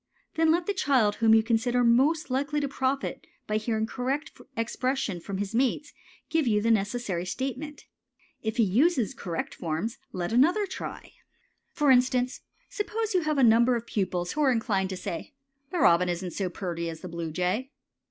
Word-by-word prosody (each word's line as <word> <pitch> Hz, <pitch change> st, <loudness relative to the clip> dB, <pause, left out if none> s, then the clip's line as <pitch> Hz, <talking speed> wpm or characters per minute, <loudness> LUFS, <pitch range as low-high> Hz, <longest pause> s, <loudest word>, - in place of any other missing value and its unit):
Then 325 Hz, 0 st, +2 dB
let 340 Hz, +1 st, +1 dB
the 405 Hz, -, 0 dB
child 255 Hz, -, +2 dB
whom 225 Hz, -1 st, +5 dB
you 220 Hz, -, +4 dB
consider 240 Hz, +2 st, +1 dB
most 270 Hz, +6 st, +3 dB
likely 285 Hz, +3 st, 0 dB
to 285 Hz, -, -1 dB
profit 270 Hz, 0 st, -2 dB, 0.2 s
by 215 Hz, -, 0 dB
hearing 220 Hz, 0 st, -1 dB
correct 265 Hz, +6 st, -3 dB, 0.3 s
expression 235 Hz, -3 st, -1 dB
from 195 Hz, +3 st, -5 dB
his 200 Hz, +2 st, -3 dB
mates 265 Hz, +4 st, 0 dB, 0.3 s
give 320 Hz, -4 st, +1 dB
you 210 Hz, -2 st, +3 dB
the 230 Hz, +2 st, +2 dB
necessary 205 Hz, -4 st, 0 dB
statement. 270 Hz, +9 st, -5 dB, 0.6 s
If 220 Hz, +1 st, -3 dB
he 235 Hz, -, +5 dB
use 250 Hz, -, +2 dB
correct 175 Hz, -9 st, -4 dB
forms, 170 Hz, +8 st, -3 dB
let 180 Hz, +3 st, -3 dB
another 345 Hz, -, +4 dB
try. 375 Hz, -, -7 dB, 0.6 s
For 295 Hz, -3 st, +3 dB
instance, 250 Hz, 0 st, +2 dB, 0.3 s
suppose 445 Hz, -1 st, -3 dB
you 365 Hz, -, +3 dB
have 310 Hz, -2 st, -1 dB
a 270 Hz, -, +4 dB
number 235 Hz, +2 st, +5 dB
of 235 Hz, -1 st, -3 dB
pupils 180 Hz, -5 st, -2 dB
who 305 Hz, -, -2 dB
are 275 Hz, -3 st, +4 dB
inclined 210 Hz, -5 st, 0 dB
to 190 Hz, -, -4 dB
say 180 Hz, -, -6 dB, 0.3 s
"The 360 Hz, -, -3 dB
robin 180 Hz, -, +4 dB
isn't 175 Hz, +1 st, -3 dB
so 190 Hz, +2 st, -2 dB
purty 170 Hz, -2 st, -4 dB
as 160 Hz, -1 st, -8 dB
the 185 Hz, -, -6 dB
bluejay." 180 Hz, +8 st, -2 dB
235 Hz, 175 wpm, -27 LUFS, 195-275 Hz, 0.6 s, whom